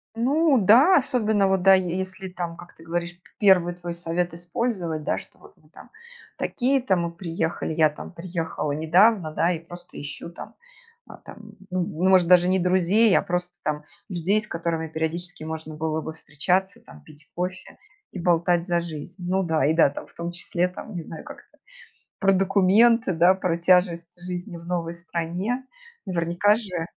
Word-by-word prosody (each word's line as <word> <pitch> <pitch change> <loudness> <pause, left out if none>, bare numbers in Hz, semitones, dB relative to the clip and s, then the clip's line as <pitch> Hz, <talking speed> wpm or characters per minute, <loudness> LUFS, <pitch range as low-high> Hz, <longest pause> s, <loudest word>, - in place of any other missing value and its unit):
Ну 275 +3 +3
да, 260 - +6
особенно 220 -7 +2
вот, 190 -1 +1
да, 195 0 +7
е 185 -2 +1
если 190 0 -2
там, 175 -2 -5
как 175 0 -13
ты 165 - -16
говоришь, 175 +1 -3
п 175 - -23
первый 180 -4 +4
твой 175 -1 -6
совет 170 0 -2
использовать, 175 -3 -2
да, - - -1
что - - -11
вот - - -17
мы - - -26
там - - -15 0.5
такие-то, 260 -5 +1
мы 170 -1 -2
приехали, 165 -2 -3
я 155 -1 +4
там 150 - -10
приехала 165 -4 -4
недавно, 170 +3 +3
да, 165 +3 +1
и 165 - -2
просто 175 +1 -11
ищу 145 +3 -7
там, 170 - -11 0.5
а - - -12
там, 215 -1 -13 0.2
ну, 185 0 0 0.3
может, 185 -2 +5
даже 180 0 +6
не 185 +1 +2
друзей, 185 +4 +3
а - - +1
просто 180 0 -3
там 150 -1 -3 0.2
людей, 190 +2 0
с 215 - -4
которыми 165 -2 -3
периодически 160 +2 -4
можно 160 -1 -6
было 155 0 -2
бы 160 - -6
встречаться 180 +6 -1
там, 75 -2 -16
пить 150 0 -13
кофе 180 +1 -5 0.3
и 190 - -7
болтать 170 0 +2
за 175 -1 +1
жизнь. 170 +3 -7
Ну 190 +1 +1
да, 160 -6 +1
и 155 - +3
да, 160 -3 +5
там, 140 - -8
в - - -21
том 170 +1 -5
числе, 175 0 -1
там, 180 +3 -10
не 175 - -4
знаю, 160 0 -9
как-то - - -13 0.6
про 195 - +3
документы, 200 +4 +4
да, 175 +3 +5
про 180 -3 -1
тяжесть 175 -1 +1
жизни 180 +1 -6
в 170 0 -10
новой 170 -1 -3
стране. 175 +9 -4 0.4
Наверняка 175 +2 +2
же 185 -7 -4
175 Hz, 180 wpm, -24 LUFS, 165-190 Hz, 0.6 s, да